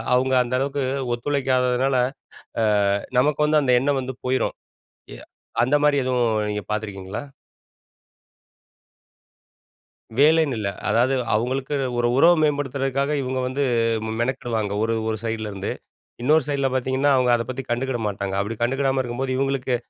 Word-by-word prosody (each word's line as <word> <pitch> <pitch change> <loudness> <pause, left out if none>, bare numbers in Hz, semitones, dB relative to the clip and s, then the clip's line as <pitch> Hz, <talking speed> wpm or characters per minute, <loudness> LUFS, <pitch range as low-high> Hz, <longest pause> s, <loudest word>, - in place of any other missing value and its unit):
அவுங்க 130 +1 +1
அந்த 120 +1 -6
அளவுக்கு 140 +1 -1 0.3
ஒத்துழைக்காததுனால, 130 0 +1 1.0
அ - - +2 0.2
நமக்கு 150 +2 +2
வந்து 150 0 +3
அந்த 125 -2 +2
எண்ணம் 140 0 +1
வந்து 130 +1 -5
போயிரும். 130 +1 0 0.6
எ - - -13 0.5
அந்த 135 +4 +3
மாரி 150 -1 +4
எதுவும் 125 -2 +1 0.2
நீங்க 105 0 -3
பார்த்துருக்கீங்களா? 105 +1 -4 2.9
வேலைன்னு 155 -2 +4
இல்ல. 105 -2 -2 0.2
அதாவது, 120 +5 +3 0.2
அவங்களுக்கு, 130 +6 -1 0.2
ஒரு 120 - +2
உறவு 170 +5 +6
மேம்படுத்துற்துக்காக 140 -1 0
இவங்க 130 0 -2
வந்து 130 +3 -2 0.4
மெ 110 - -3
மெனக்கிடுவாங்க. 115 -4 -1
ஒரு 115 +1 +1
ஒரு 110 - -1
சைடுல 110 -1 -3
இருந்து. 100 0 -4 0.5
இன்னொரு 155 +4 +4
சைடுல 140 -2 +1
பார்த்தீங்கன்னா 130 +2 +1
அவங்க 125 -1 +2
அதப்பத்தி 130 +3 -4
கண்டுக்குட 125 +1 -1
மாட்டாங்க. 100 -1 -4
அப்படி 105 +3 -3
கண்டுக்குடாம 135 +2 +1
இருக்கும்போது, 130 +2 -3
இவங்களுக்கு 135 -2 0
130 Hz, 130 wpm, -23 LUFS, 120-140 Hz, 2.9 s, உறவு